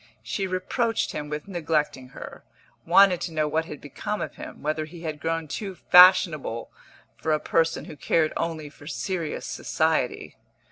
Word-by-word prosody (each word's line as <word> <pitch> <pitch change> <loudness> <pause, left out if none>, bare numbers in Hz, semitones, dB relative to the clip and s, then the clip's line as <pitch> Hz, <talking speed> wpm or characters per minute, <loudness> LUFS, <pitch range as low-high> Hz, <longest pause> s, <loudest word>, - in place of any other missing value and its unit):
She 195 -2 -2
reproached 225 +5 -1
him 150 0 -5
with 150 +2 -5
neglecting 155 -7 -1
her, - - -10 0.4
wanted 185 +1 +6
to 170 - -3
know 155 -1 0
what 160 +2 0
had 150 -3 -8
become 200 +8 -5
of - - -4
him, - - -10
whether 155 +1 -1
he 165 +2 -12
had 155 -3 -4
grown 165 0 -2
too 195 +5 -5
fashionable 175 -11 +5 0.5
for 160 - 0
a 155 - +2
person 165 +1 0
who 155 - -9
cared 155 +2 +1
only 160 -2 -3
for 145 0 -14
serious 175 -2 -3
society. - - -1
160 Hz, 160 wpm, -25 LUFS, 150-180 Hz, 0.5 s, wanted